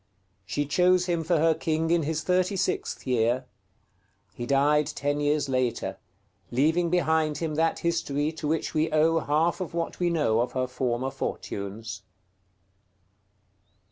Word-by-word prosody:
She 145 +9 -1
chose 180 +4 +3
him 170 -2 0
for 170 +1 +2
her 160 +1 +4
king 160 +1 -1
in 170 -1 +3
his 155 +1 -2
36th 185 +1 0
year; 125 +1 +1 0.9
he 120 +3 -6
died 145 +2 +3
ten 145 -1 -2
years 145 0 +1
later, 130 -3 -1 0.5
leaving 160 +7 +2
behind 160 -3 +1
him 160 -2 -2
that 160 +1 +1
history 155 -3 0
to 155 -2 -5
which 160 +1 -1
we 155 0 +1
owe 160 +2 +3
half 160 +5 +1
of 175 -2 -5
what 170 -1 -3
we 175 -1 +2
know 150 -10 +2
of 120 +1 -1
her 130 -1 0
former 125 0 -2
fortunes. 100 -2 -5
155 Hz, 140 wpm, -27 LUFS, 135-165 Hz, 0.9 s, her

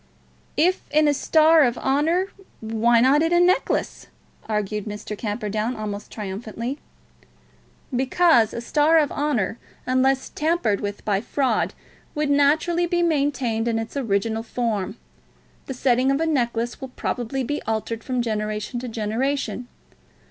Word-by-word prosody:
"If 360 +4 +3
in 305 +1 +3
a 295 - +4
star 315 +3 +5
of 245 -4 +2
honour, 325 +8 +1 0.3
why 225 +1 +2
not 270 +4 +5
in 325 +1 +1
a 345 - +4
necklace?" 360 +1 +1 0.4
argued 210 -1 -2
Mr. 210 0 -6
Camperdown 215 +2 -2
almost 210 -1 -5
triumphantly. 220 +6 -5 1.2
"Because 260 -2 +3
a 235 - -5
star 300 +6 +3
of 300 -3 +2
honour, 240 -8 -1 0.3
unless 260 +1 +1
tampered 310 - 0
with 205 0 -5
by 200 -2 +1
fraud, 265 +3 0 0.4
would 300 -1 0
naturally 315 +5 +3
be 345 0 +1
maintained 275 -8 0
in 230 -1 +1
its 225 +3 -5
original 225 -3 0
form. 225 -3 -2 0.7
The 265 - -5
setting 250 +1 +2
of 275 +1 +2
a 325 - +1
necklace 240 -6 -1
will 265 - -4
probably 250 +1 -3
be 290 +4 -3
altered 225 +1 -2
from 255 -2 -1
generation 215 +1 -3
to 250 - -6
generation. 245 +4 -2
245 Hz, 140 wpm, -23 LUFS, 220-290 Hz, 1.2 s, star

